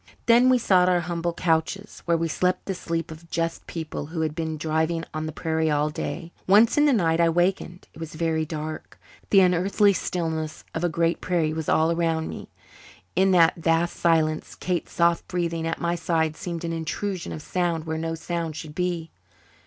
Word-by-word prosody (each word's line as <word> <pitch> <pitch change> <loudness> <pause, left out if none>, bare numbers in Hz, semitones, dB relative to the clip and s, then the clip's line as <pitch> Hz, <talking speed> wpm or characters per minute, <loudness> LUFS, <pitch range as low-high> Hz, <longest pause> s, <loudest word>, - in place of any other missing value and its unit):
Then 240 +2 +6
we 255 - +5
sought 185 -6 +4
our 180 -1 +3
humble 170 0 -2
couches, 170 +4 -1
where 170 -1 +2
we 165 0 0
slept 180 +3 0
the 195 - -2
sleep 165 -2 -3
of 165 +1 -12
just 165 0 -2
people 160 -3 -5
who 160 +1 -4
had 155 -1 -1
been 160 -1 -3
driving 160 +2 -1
over 155 0 -3
the - - -4
prairie 160 0 -1
all 150 0 +1
day. 170 +2 -5 0.2
Once 210 +4 +6
in 295 - +4
the - - +5
night 165 -9 +2
I 170 -1 +4
wakened. 175 +1 0
It - - -14
was 165 -1 -7
very 160 -1 0
dark. 155 0 -6 0.3
The 195 - +6
unearthly 190 +3 +3
stillness 160 -4 -3
of 165 - -3
a 175 - +2
great 165 +1 0
prairie 165 -4 0
was 160 -1 -3
all 160 +1 +3
around 165 -1 0
me. - - -8 0.7
In 190 +2 +4
that 165 -2 +5
vast 165 +1 +1
silence 160 -2 +1
Kate's 180 -3 -3
soft 170 0 +2
breathing 170 -2 -2
at 165 - -2
my 170 0 0
side 160 -2 0
seemed 170 0 -5
an 165 0 -2
intrusion 175 +3 -3
of 155 - -6
sound 170 -3 -1
where 160 0 -3
no 165 0 -2
sound 165 -1 -4
should 150 -1 -7
be. 175 -1 -2
165 Hz, 195 wpm, -25 LUFS, 160-175 Hz, 0.7 s, Then